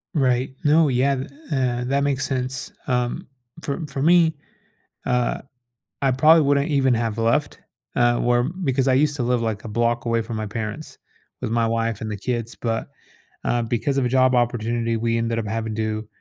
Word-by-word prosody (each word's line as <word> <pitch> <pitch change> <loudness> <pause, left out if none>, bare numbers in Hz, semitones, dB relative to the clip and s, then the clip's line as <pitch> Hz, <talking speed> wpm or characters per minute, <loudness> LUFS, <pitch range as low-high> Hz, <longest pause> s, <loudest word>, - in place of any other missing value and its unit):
Right. 130 -2 +1
No, 155 +1 +4
yeah. 135 +2 +2
Th 135 +1 -4 0.2
uh, 125 -3 0
that 140 +2 +1
makes 135 -1 0
sense. 130 0 -3 0.2
Um, 125 -1 -1 0.3
for 145 +4 -3
for 140 -1 -4
me, 165 0 +4 0.7
uh, 125 -1 0 0.6
I 135 -2 +3
probably 155 +5 +6
wouldn't 140 +2 +2
even 135 -4 +3
have 115 -1 -1
left, 115 +6 0 0.4
uh, 120 -1 +3
where 120 0 +2
because 140 -5 -1
I 130 - +4
used 145 +2 +3
to 125 - -1
live, 125 -1 +1
like 110 -2 -3
a - - -4
block 115 +2 0
away 115 0 +1
from 110 0 -5
my 110 - -3
parents 110 +7 -6 0.4
with - - -3
my 115 -1 +2
wife 115 -1 -1
and 110 - -4
the 105 - -3
kids. 120 +1 -3
But 115 -1 -2 0.6
uh, 120 -1 +1
because 120 +4 -1
of 130 - +2
a - - +1
job 130 0 +3
opportunity, 120 -1 0
we 115 +1 0
ended 115 0 -1
up 115 - -3
having 110 0 -3
to, 110 0 -2
125 Hz, 190 wpm, -23 LUFS, 115-135 Hz, 0.7 s, probably